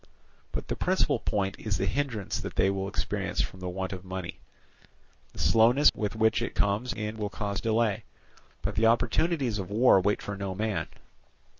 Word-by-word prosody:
"But - - -4
the - - -2
principal - - +1
point 95 -1 -1
is 105 -3 -1
the 95 - 0
hindrance 115 -1 -2
that - - -6
they 95 +1 +3
will 95 0 -2
experience 100 - -3
from 95 - -2
want 90 +1 -4
of 95 -1 -7
money. 95 -1 -6 0.9
The - - -15
slowness 115 - +5
with 105 0 -3
which 110 0 +2
it - - -3
comes 105 +5 +1
in 105 +1 -4
will 105 -1 -2
cause 100 -2 -3
delay; 110 -2 +1 0.6
but 100 +3 -1
the 110 +3 +3
opportunities 125 0 +1
of 95 -1 -5
war 105 -2 +5
wait 100 +2 +1
for 100 - -4
no 100 -1 -4
man. 110 +1 -1
105 Hz, 175 wpm, -28 LUFS, 95-115 Hz, 0.9 s, slowness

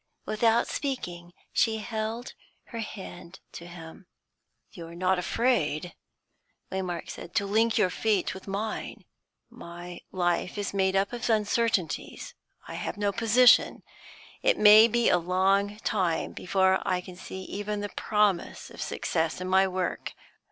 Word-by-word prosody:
Without 225 +2 +2
speaking, 175 - -4 0.2
she 220 -1 +2
held 220 +2 -4 0.4
her 230 - -6
hand 190 -4 -8
to 170 - -9
him. 170 +1 -11 0.6
"You 170 -4 -9
are 170 - -11
not 185 +1 +1
afraid," 180 - 0 0.8
Waymark 185 -2 -3
said, 175 - -10
"to 200 - +2
link 225 +3 +2
your 185 - +3
fate 210 0 0
with 190 +1 -11
mine? 205 +3 -4 0.5
My 175 +1 -9
life 180 +1 -1
is 205 -1 -3
made 190 -1 +1
up 195 +4 +1
of 240 0 -3
uncertainties. 215 -6 0 0.3
I - - -7
have - - -4
no 205 -1 +1
position; 230 +4 +4 0.6
it - - +3
may 215 +2 +8
be 235 +1 +1
a 180 - +4
long 195 +4 +1
time 180 -7 0
before 190 +1 +1
I 185 -1 0
can 180 0 -11
see 190 +1 -8
even 205 +2 -4
the 205 - -4
promise 210 -5 0
of - - -9
success 160 +1 -1
in 185 - -4
my 190 +1 +4
work. 185 -1 -3
195 Hz, 145 wpm, -27 LUFS, 180-215 Hz, 0.8 s, may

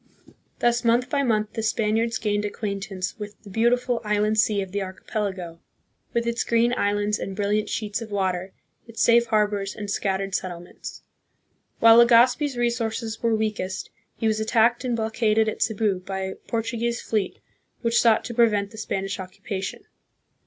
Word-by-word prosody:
Thus 240 0 +2
month 240 +2 +2
by 285 - +2
month 215 -5 0
the 225 - -3
Spaniards 220 +1 +1
gained 210 -1 -1
acquaint 200 -1 -4
ance 185 +1 -4
with 210 0 -7
the 200 - -11
beautiful 240 +3 +1
island 210 +1 +1
sea 210 -1 +3
of 190 - -10
the 200 +1 -2
archipelago, 190 -2 -4 0.5
with 235 -1 0
its 235 0 0
green 235 +1 +2
islands 205 -1 0
and 195 - -5
brilliant 210 +1 0
sheets 215 0 -2
of 225 - -7
water, 190 -2 -1 0.4
its 230 -1 -10
safe 235 0 +5
harbors 210 -2 0
and 205 -1 -5
scattered 195 -1 -1
settlements. 175 -2 -6 0.8
While 230 0 +8
Legazpi's 245 +3 +5
resources 230 -2 -1
were 230 -1 +2
weakest, 210 -3 -3 0.3
he - - -3
was 220 -1 +2
attacked 230 +2 +2
and 245 -2 0
blockaded 220 -1 +1
at 215 - -3
Cebu 210 -3 +1
by 190 +1 -5
a 190 0 -4
Portuguese 235 +1 -2
fleet 210 -4 -2 0.5
which 230 0 +3
sought 230 -2 +4
to 240 - -5
prevent 210 -4 +2
the 220 - -10
Spanish 195 -3 -3
occupation. 190 +1 -6
215 Hz, 160 wpm, -24 LUFS, 200-230 Hz, 0.8 s, While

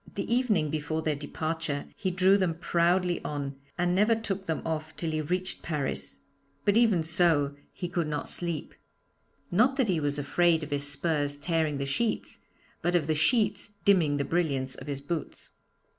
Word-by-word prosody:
The 200 +3 -1
evening 215 - +2
before 155 +1 -2
their 155 - +1
departure 155 0 -3
he 190 - -2
drew 185 +2 +4
them 185 -5 +1
proudly 175 +1 +1
on, 140 -2 -4 0.2
and 175 0 +1
never 210 +5 +4
took 200 -3 -4
them 160 - -2
off 160 -1 -4
till 165 -2 -2
he 155 0 -1
reached 180 +5 -2
Paris! 135 - -3 0.4
But 205 -1 +3
even 220 -8 +4
so, 160 -3 +2 0.2
he 180 - -5
could 170 -2 -1
not 150 -1 -3
sleep. 170 -3 -2 0.8
Not 240 +9 +4
that 260 -6 +1
he 175 -4 +2
was 145 -1 0
afraid 160 +3 +2
of 150 - -7
his 145 0 +4
spurs 145 -1 +1
tearing 155 -1 0
the 140 - -2
sheets, 225 +12 -1 0.4
but 175 +1 +1
of 165 -4 +2
the 155 - +1
sheets 205 +6 +1
dimming 165 -8 +4
the 140 - -1
brilliance 140 -6 0
of - - -9
his 140 -1 -4
boots. 155 +3 -5
165 Hz, 175 wpm, -28 LUFS, 145-185 Hz, 0.8 s, drew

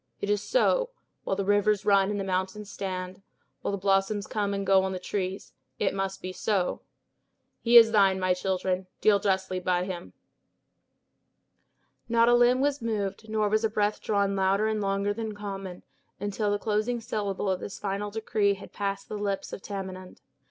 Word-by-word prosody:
It 200 - -1
is 205 -1 +1
so; - - +2 0.3
while - - -1
the 200 0 -2
rivers 205 0 +2
run 200 -1 +4
and 205 -1 -2
the - - -1
mountains 190 +2 -2
stand, 185 -1 -5 0.4
while - - -2
the 200 - -1
blossoms 195 +1 +1
come 205 0 -1
and 200 0 -2
go 195 0 +5
on 190 0 -2
the - - -3
trees, 190 +1 -4 0.2
it - - 0
must 195 0 -3
be 185 0 -4
so. 190 -2 -1 0.8
He 235 0 +7
is 225 -1 +8
thine, 195 -3 +4
my 185 -1 +2
children; 185 0 -1
deal 205 -2 +4
justly 190 -2 0
by 180 0 +1
him." 180 -2 -6 2.0
Not 230 0 +4
a - - +5
limb 245 +1 +5
was 285 -1 +1
moved, 220 -1 -3
nor 215 -1 +1
was 215 +2 +1
a 220 - +2
breath 210 0 0
drawn 200 -2 +1
louder 195 +2 +2
and 215 -1 -1
longer 200 +1 0
than 220 -1 -5
common, 195 -3 -6 0.4
until 205 +1 -1
the 205 - +1
closing 215 +3 -1
syllable 205 -3 -3
of 190 -1 0
this 200 - -7
final 205 +1 -3
decree 205 -1 +1
had 195 - -12
passed 200 -1 -3
the 210 - -5
lips 200 -1 -3
of - - -6
Tamenund. 190 -2 -7
200 Hz, 180 wpm, -27 LUFS, 190-210 Hz, 2.0 s, is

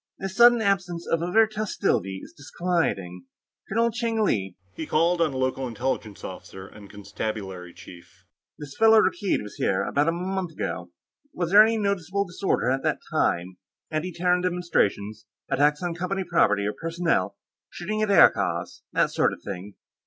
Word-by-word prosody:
This 190 0 -5
sudden 240 0 +6
absence 180 -4 0
of 165 - 0
overt 215 +5 +3
hostility 120 - -1
is - - -12
disquieting. 145 - -2 0.4
Colonel 230 +3 +2
Cheng 230 -1 -1
Li," 95 - -1 0.2
he 160 - -6
called 170 +2 +2
on 165 - +3
the 135 - -5
local 130 0 -1
Intelligence 120 -3 -4
officer 95 +1 -9
and 100 -1 -14
Constabulary 100 -3 -6
chief. 85 0 -15 0.3
"This 145 -2 -9
fellow 225 0 +7
Rakkeed 195 - +1
was 105 - -10
here, 95 - +1
about 145 +2 0
a - - +4
month 180 0 -3
ago. - - -4 0.5
Was 175 -1 -2
there 205 +2 +9
any 225 +1 +4
noticeable 200 -1 -1
disorder 180 -7 -1
at 135 +1 0
that - - 0
time? 90 +1 0 0.3
Anti 155 +4 -2
Terran 180 +1 +1
demonstrations, 110 - -1 0.2
attacks 150 +3 +2
on 175 -1 -1
Company 180 +3 -2
property 105 - +2
or 105 - -1
personnel, 165 - -1 0.3
shooting 215 +5 -4
at 215 - 0
aircars, 195 -4 +3
that - - +2
sort - - +2
of - - -12
thing?" 100 0 -7
170 Hz, 160 wpm, -25 LUFS, -, 0.5 s, there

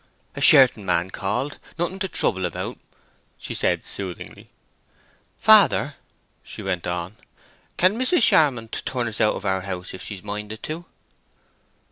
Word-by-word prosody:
"A - - -6
Sherton 125 -6 +6
man 85 0 0
called—nothing 145 - -4
to 190 - -1
trouble 95 - 0
about," - - -6 0.6
she - - -6
said, - - 0
soothingly. 95 -3 -7 0.9
"Father," - - +5 0.5
she - - -9
went 90 -3 -2
on, 90 +3 -4 0.6
"can 190 +6 +3
Mrs. 255 +2 +2
Charmond 125 - +3
turn 125 -2 -2
us 110 -1 -3
out 105 - +3
of 100 - -7
our 95 -1 0
house 90 -1 -6
if 95 - -9
she's 95 -2 -6
minded 105 +1 -6
to?" 165 +3 -5
105 Hz, 135 wpm, -23 LUFS, 95-140 Hz, 0.9 s, Sherton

